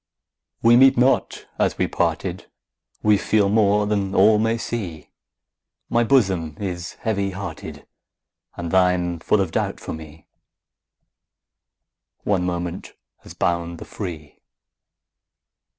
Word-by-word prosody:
We 115 +1 +7
meet 135 0 +6
not 130 +2 +1
as - - +1
we - - +1
parted, - - -2 0.5
We 105 -2 +4
feel 105 -2 +2
more 105 -1 +3
than 100 -2 -1
all 110 -1 +5
may 115 +1 +1
see; 100 -9 -5 0.8
My 120 - +3
bosom 95 - +1
is 90 -3 -4
heavy 100 -3 -1
hearted, 100 +1 -7 0.7
And 85 -1 -4
thine 90 -2 +2
full 105 +6 +1
of 95 -4 -2
doubt - - -2
for - - -6
me: 80 -1 -11 2.0
One 95 -3 +1
moment 85 0 -4 0.3
has - - -13
bound 85 0 -1
the - - -9
free. 80 -7 -8
95 Hz, 120 wpm, -22 LUFS, 85-105 Hz, 2.0 s, We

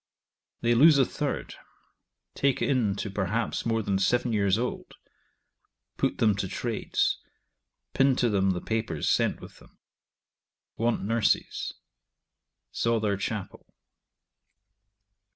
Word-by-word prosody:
They 120 0 +3
lose 145 +5 +7
a 135 - +5
third; - - -4 0.8
take 140 -1 +1
in 120 -8 +1
to 100 0 -4
perhaps 105 +5 -2
more 115 -1 0
than 100 -1 0
seven 120 +4 +1
[years 100 -2 +2
old]; 125 +2 -4 1.0
put - - -1
them 110 -2 +3
to 100 - -2
trades; 115 +3 -1 0.7
pin 135 -1 +3
to 125 - +2
them 100 -3 +2
the 90 -2 -1
papers 110 -9 -2
sent - - +1
with - - -12
them. - - -20 1.0
Want 115 +1 0
nurses. 115 +1 0 1.0
Saw 115 0 +1
their 105 -2 0
chapel. 100 0 -5
110 Hz, 115 wpm, -27 LUFS, 100-120 Hz, 1.0 s, lose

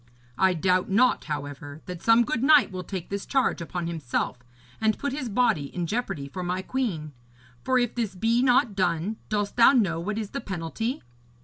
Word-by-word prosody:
I 190 -1 +4
doubt 185 +2 +1
not, 245 +6 +3
however, 145 0 -6
that 180 -3 -7
some 230 +1 +5
good 250 0 -1
knight 285 -4 +5
will 185 -1 -5
take 180 -1 -6
this 200 0 -3
charge 265 -9 0
upon 170 +1 -4
himself, 150 -6 -2 0.4
and 220 -1 +2
put 285 -2 -3
his 275 -4 -3
body 205 - +2
in 175 +5 -4
jeopardy 195 - -3
for 180 +6 -6
my 180 +1 -2
queen. 185 - -2 0.5
For 260 - +2
if 245 -1 +1
this 225 -5 -2
be 230 +5 +2
not 245 -4 +3
done, 185 +2 0
dost 205 0 -2
thou 235 +3 +7
know 190 -10 +2
what 205 +5 -3
is 215 -3 -4
the 275 - -4
penalty?' 195 - -4
195 Hz, 190 wpm, -26 LUFS, 170-240 Hz, 0.5 s, thou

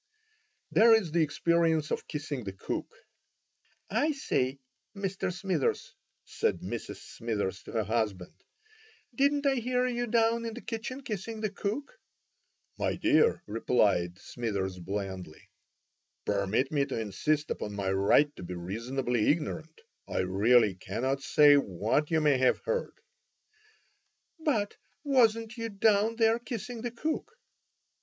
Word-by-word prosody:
There 225 +1 +7
is 195 -8 0
the 170 +1 +2
experience 160 0 +2
of - - -2
kissing 145 -4 -4
the 95 -2 -5
cook. 95 - -4 1.0
"I 290 +9 +1
say, 135 - -1 0.4
Mr. 195 -2 -2
Smithers," 180 -4 -1 0.3
said - - -1
Mrs. - - -5
Smithers 105 -4 -4
to - - -11
her 110 -2 +1
husband, 105 -4 -2 0.8
"didn't 285 +3 +2
I 275 -1 +3
hear 250 +1 +1
you 245 -1 -1
down 230 0 +2
in 225 -1 -4
the 245 - -7
kitchen 245 +3 -5
kissing 220 0 -5
the 215 -2 -1
cook?" 275 - -4 0.8
"My - - 0
dear," 465 - +3
replied 100 -5 +1
Smithers, 100 -6 -3
blandly, 95 -3 -6 0.8
"permit 100 +6 0
me 145 -2 +2
to 130 - -3
insist 145 +9 -1
upon 105 - -4
my 100 -1 -1
right 100 +10 +3
to - - -8
be 90 0 -6
reasonably 115 +6 -1
ignorant. 160 0 -2 0.3
I - - -1
really 105 +4 +4
cannot 130 +9 -2
say 145 0 +6
what 110 - 0
you 160 -1 +2
may 145 -4 +3
have 130 - +4
heard." 485 0 -1 1.5
"But 245 -11 0 0.3
wasn't 230 -4 +2
you 230 0 -3
down 210 +1 +2
there 225 0 +3
kissing 240 -1 -6
the 240 - -2
cook?" 310 - -3
155 Hz, 135 wpm, -29 LUFS, -, 1.5 s, There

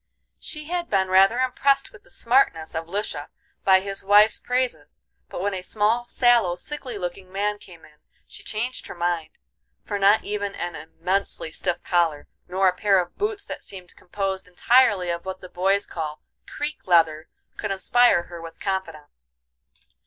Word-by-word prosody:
She 305 -1 -6
had 345 +1 -3
been 190 -2 +1
rather 195 +5 +5
impressed 275 +2 +1
with 410 - -16
the - - -23
"smartness" 230 -11 +1
of 165 0 -4
Lisha 170 -6 -3 0.4
by 190 -1 +5
his 195 0 -6
wife's 205 +2 +5
praises, 250 0 -2 0.3
but - - -5
when 205 0 0
a 185 - -3
small, 215 +5 +1
sallow, 240 -9 +3
sickly 255 +1 -7
looking 185 0 -6
man 205 +2 -1
came 175 -5 -15
in 150 -1 -22 0.3
she - - -10
changed 235 +4 -3
her - - -8
mind; 170 -2 -1 0.5
for 205 - -3
not 200 +2 +5
even 205 -1 -3
an 175 0 -4
immensely 170 +1 -3
stiff 175 +1 -3
collar, 165 -4 +1 0.2
nor 190 +2 +2
a 180 - +3
pair 195 0 +3
of 175 -1 -4
boots 415 0 -2
that - - -7
seemed 185 -3 -10
composed 190 0 -4
entirely 190 -1 +3
of 170 0 -4
what 190 0 -6
the 185 - -11
boys 195 +3 +1
call 155 -2 -6 0.2
"creak 295 -5 -5
leather," 160 -3 +3 0.3
could 210 - -3
inspire 195 0 +3
her 170 -1 -10
with 165 0 -10
confidence. 155 - -5
190 Hz, 165 wpm, -24 LUFS, 175-215 Hz, 0.5 s, rather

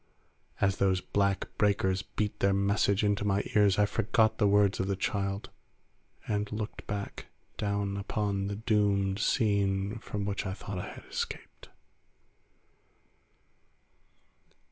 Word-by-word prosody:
As 100 -1 +2
those 95 -1 +2
black 100 0 0
breakers 95 -2 +2
beat 105 +1 -3
their 100 0 +3
message 100 +1 +2
into 105 -1 +1
my 100 0 +1
ears 105 -3 +4
I 105 - +5
forgot 110 +1 +2
the 105 - +4
words 100 -1 +3
of 95 - 0
the 100 - 0
child 100 +1 -2 0.8
and 105 -1 -1
looked 105 0 -5
back, 100 0 -5 0.3
down 100 -1 -1
upon 100 -1 -1
the 100 - -3
doomed 100 -3 +1
scene 100 -1 +1
from 105 -1 -4
which 100 -1 -2
I 95 - -3
thought 100 -2 -6
I - - -5
had - - -10
escaped. - - -6
100 Hz, 130 wpm, -30 LUFS, 100-105 Hz, 0.8 s, I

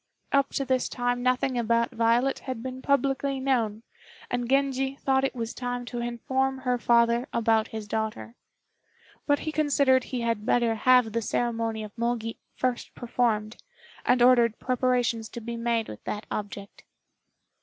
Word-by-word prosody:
Up 275 0 +3
to 275 - -1
this 260 -1 0
time 245 0 -1
nothing 255 0 +1
about 235 +1 +1
Violet 235 +3 +2
had 255 -4 -6
been 260 0 -6
publicly 275 0 +1
known, 230 -5 0 0.5
and 245 -1 -1
Genji 270 0 +1
thought 265 -1 +1
it 270 - -1
was 230 -1 -4
time 245 -1 -4
to 240 0 -5
inform 260 +3 -1
her 250 -2 -1
father 235 +2 +3
about 225 -1 +2
his 220 -2 -7
daughter; 220 +1 -3 0.9
but 290 -1 +4
he 310 - -3
considered 280 -4 +3
he 250 -2 -4
had 230 -2 -1
better 235 0 +2
have 250 0 +4
the 230 - 0
ceremony 230 -1 -1
of 210 -1 -10
Mogi 235 -1 -2 0.2
first 255 -1 -2
performed, 230 -3 -1 0.5
and 250 -1 +3
ordered 240 -3 +5
preparations 250 -3 0
to - - -7
be 235 +1 -5
made 230 -1 0
with 105 - -9
that 210 - -4
object. 200 -1 -6
240 Hz, 155 wpm, -27 LUFS, 230-260 Hz, 0.9 s, ordered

